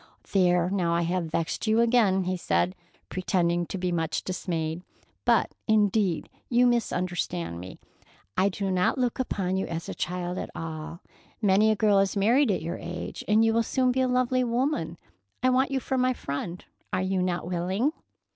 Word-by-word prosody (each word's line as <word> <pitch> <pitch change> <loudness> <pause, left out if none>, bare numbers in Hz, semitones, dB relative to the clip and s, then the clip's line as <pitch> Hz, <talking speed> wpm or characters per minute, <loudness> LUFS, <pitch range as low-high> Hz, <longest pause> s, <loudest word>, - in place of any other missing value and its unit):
"There, 180 -3 +3
now 175 -4 +1
I 170 - +1
have 175 +1 -1
vexed 165 +5 -2
you 220 +1 +3
again," 230 -5 +3
he 185 +1 -1
said, 180 0 0 0.4
pretending 175 -2 0
to - - -4
be 180 -1 -1
much 165 -2 -1
dismayed, 165 -3 -3 0.4
"but - - +3 0.2
indeed 205 -4 +2 0.2
you 245 0 +4
misunderstand 175 - -1
me. 90 +1 -9 0.6
I 195 +2 +3
do 195 0 -2
not 180 +5 +2
look 250 -1 0
upon 190 -7 -1
you 190 - -1
as 165 0 -5
a - - -4
child 180 0 -3
at - - -5
all. 165 +1 -6 0.4
Many 210 0 +4
a 215 - +3
girl 205 -1 +4
is 195 +1 +1
married 235 +8 +4
at 185 -5 0
your 170 +2 -3
age, 175 +1 -6
and 215 +2 +4
you 225 - +3
will 230 - +3
soon 255 +2 +1
be 260 +1 +1
a 260 - +2
lovely 255 0 +2
woman. 235 - -1 0.5
I 255 - +4
want 260 +2 +3
you 270 -1 0
for 260 +1 -2
my 255 0 +3
friend. 170 - -5 0.3
Are 185 0 0
you 190 0 0
not 180 -2 -1
willing?" 185 - 0
185 Hz, 185 wpm, -27 LUFS, 175-230 Hz, 0.6 s, you